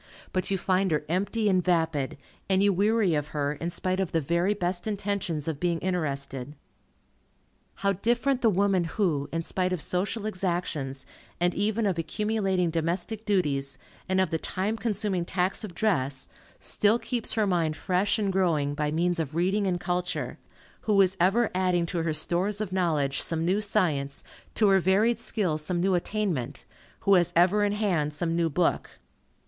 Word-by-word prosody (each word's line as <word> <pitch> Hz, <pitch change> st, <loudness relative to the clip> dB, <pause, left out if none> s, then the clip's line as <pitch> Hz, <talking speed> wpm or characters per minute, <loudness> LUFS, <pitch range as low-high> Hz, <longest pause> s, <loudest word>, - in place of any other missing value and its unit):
But 185 Hz, -, -1 dB
you 195 Hz, -, +1 dB
find 190 Hz, +1 st, +1 dB
her 150 Hz, -2 st, 0 dB
empty 200 Hz, +6 st, 0 dB
and 185 Hz, -3 st, +3 dB
vapid, 160 Hz, -7 st, 0 dB, 0.3 s
and 190 Hz, 0 st, +3 dB
you 200 Hz, -1 st, +4 dB
weary 205 Hz, -1 st, +2 dB
of 150 Hz, -1 st, -1 dB
her, 145 Hz, 0 st, 0 dB
in 165 Hz, +3 st, -4 dB
spite 185 Hz, +2 st, -2 dB
of 190 Hz, -3 st, -1 dB
the 165 Hz, -, +3 dB
very 170 Hz, +7 st, +1 dB
best 180 Hz, 0 st, -2 dB
intentions 200 Hz, -7 st, -2 dB
of 155 Hz, -3 st, -2 dB
being 175 Hz, -1 st, +1 dB
interested. 140 Hz, -6 st, -2 dB, 1.2 s
How 200 Hz, 0 st, +1 dB
different 240 Hz, +7 st, +1 dB
the 230 Hz, -, +5 dB
woman 195 Hz, -2 st, +2 dB
who, 165 Hz, -5 st, -1 dB
in 165 Hz, 0 st, -2 dB
spite 185 Hz, +2 st, -1 dB
of 180 Hz, -, -1 dB
social 195 Hz, +7 st, -2 dB
exactions, 170 Hz, -9 st, -2 dB, 0.3 s
and 175 Hz, 0 st, +2 dB
even 215 Hz, +2 st, 0 dB
of 185 Hz, -4 st, 0 dB
accumulating 190 Hz, 0 st, 0 dB
domestic 175 Hz, +7 st, -2 dB
duties, 140 Hz, -9 st, 0 dB, 0.3 s
and 190 Hz, 0 st, +2 dB
of 185 Hz, -3 st, +1 dB
the 160 Hz, -, 0 dB
time 195 Hz, +7 st, -2 dB
consuming 205 Hz, -4 st, -1 dB
tax 180 Hz, +4 st, -1 dB
of 190 Hz, -5 st, -7 dB
dress, 140 Hz, -11 st, 0 dB, 0.3 s
still 210 Hz, +2 st, +2 dB
keeps 240 Hz, -1 st, -2 dB
her 220 Hz, -2 st, +2 dB
mind 170 Hz, -5 st, +1 dB
fresh 185 Hz, +2 st, +1 dB
and 200 Hz, -3 st, 0 dB
growing, 160 Hz, -7 st, +1 dB
by 150 Hz, 0 st, -1 dB
means 170 Hz, +3 st, 0 dB
of 155 Hz, -1 st, -3 dB
reading 190 Hz, +4 st, +1 dB
and 180 Hz, -2 st, 0 dB
culture, 180 Hz, 0 st, -2 dB, 0.4 s
who 210 Hz, -2 st, +2 dB
is 190 Hz, -1 st, +4 dB
ever 205 Hz, +7 st, +3 dB
adding 180 Hz, -2 st, +1 dB
to 170 Hz, 0 st, -2 dB
her 160 Hz, -1 st, -1 dB
stores 180 Hz, +6 st, 0 dB
of 215 Hz, -4 st, -3 dB
knowledge 155 Hz, -7 st, +1 dB
some 165 Hz, 0 st, +1 dB
new 190 Hz, +4 st, +2 dB
science, 150 Hz, -9 st, 0 dB, 0.3 s
to 215 Hz, -, +4 dB
her 195 Hz, 0 st, +5 dB
varied 205 Hz, +6 st, +2 dB
skill 190 Hz, -9 st, -1 dB
some 175 Hz, +3 st, -1 dB
new 190 Hz, +2 st, +2 dB
attainment, 180 Hz, -, -2 dB, 0.4 s
who 200 Hz, -, +4 dB
has 175 Hz, -3 st, +4 dB
ever 185 Hz, +5 st, +4 dB
in 205 Hz, 0 st, +1 dB
hand 175 Hz, -9 st, 0 dB
some 165 Hz, +2 st, -1 dB
new 170 Hz, -1 st, +1 dB
book. 165 Hz, +3 st, 0 dB
180 Hz, 175 wpm, -27 LUFS, 165-200 Hz, 1.2 s, the